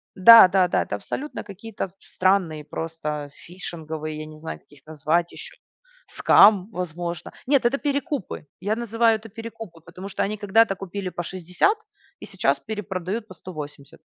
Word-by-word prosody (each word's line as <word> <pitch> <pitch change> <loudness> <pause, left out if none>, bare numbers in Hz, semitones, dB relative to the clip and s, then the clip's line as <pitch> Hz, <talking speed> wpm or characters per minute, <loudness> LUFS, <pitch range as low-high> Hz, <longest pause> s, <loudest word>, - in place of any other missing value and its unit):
Да-да-да. 190 -3 +8
Это 105 - -4
абсолютно 285 - -5
какие-то 205 0 -6
в - - -30
странные 185 -5 +1
просто 150 -2 -5
фишинговые, 160 -3 -7
я 155 - -6
не 155 0 -12
знаю, 160 +1 -7
как - - -36
их 145 - -20
назвать 160 +3 0
ещё, - - -10 0.6
scam, 200 -3 +6
возможно. 175 -1 -5 0.2
Нет, 275 -3 +3
это 270 +4 +3
перекупы. 285 - -3
Я 205 +4 -1
называю 230 -1 +2
это 220 +1 -13
перекупы, 225 -6 -9
потому 190 +4 -10
что - - -1
они 210 +2 -2
когда-то 205 +1 +3
купили 195 0 -5
по 175 - -5
60 185 - 0 0.4
и - - -9
сейчас - - 0
перепродают 210 0 -4
по 185 - -11
180. 150 -6 -10
185 Hz, 155 wpm, -24 LUFS, 165-220 Hz, 0.6 s, Да-да-да